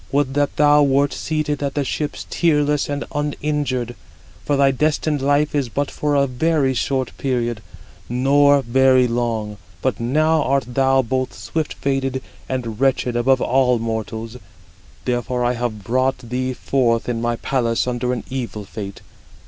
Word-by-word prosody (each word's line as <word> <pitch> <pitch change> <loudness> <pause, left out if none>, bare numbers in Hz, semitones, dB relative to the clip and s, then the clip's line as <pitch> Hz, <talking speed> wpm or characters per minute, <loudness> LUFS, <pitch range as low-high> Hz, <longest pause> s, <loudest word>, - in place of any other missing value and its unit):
Would 140 -1 +1
that 145 0 0
thou 150 0 +5
wert 140 0 +3
seated 150 -2 -2
at 140 -1 -2
the 145 - +1
ships 145 +2 -3
tearless 150 -4 +2
and 145 0 -2
uninjured; 145 -4 -2 0.5
for 145 - 0
thy 135 -1 +4
destined 150 +1 0
life 145 +2 +2
is 140 -4 0
but 140 +4 -2
for 150 -1 -1
a 140 -1 +4
very 140 +1 +1
short 130 0 -1
period, 120 -4 -1 0.5
nor 140 +3 +4
very 130 +1 +4
long; 115 -3 -2 0.2
but 130 - -1
now 155 +6 +2
art 135 -2 +1
thou 135 +1 +2
both 130 +2 -2
swift 160 -2 -3
fated 135 -1 -1 0.3
and 120 -5 -3
wretched 130 -2 +1
above 130 +2 +3
all 125 -1 +3
mortals: 115 +1 -4 0.7
therefore 125 0 -1
have 120 0 -5
I 105 - -13
brought 130 +5 +1
thee 125 +1 -3
forth 120 -3 0
in 120 -2 -2
my 120 0 0
palace 115 -2 0
under 125 0 -1
an 125 - -3
evil 120 -5 -4
fate. 100 -1 -7
130 Hz, 155 wpm, -20 LUFS, 120-145 Hz, 0.7 s, thou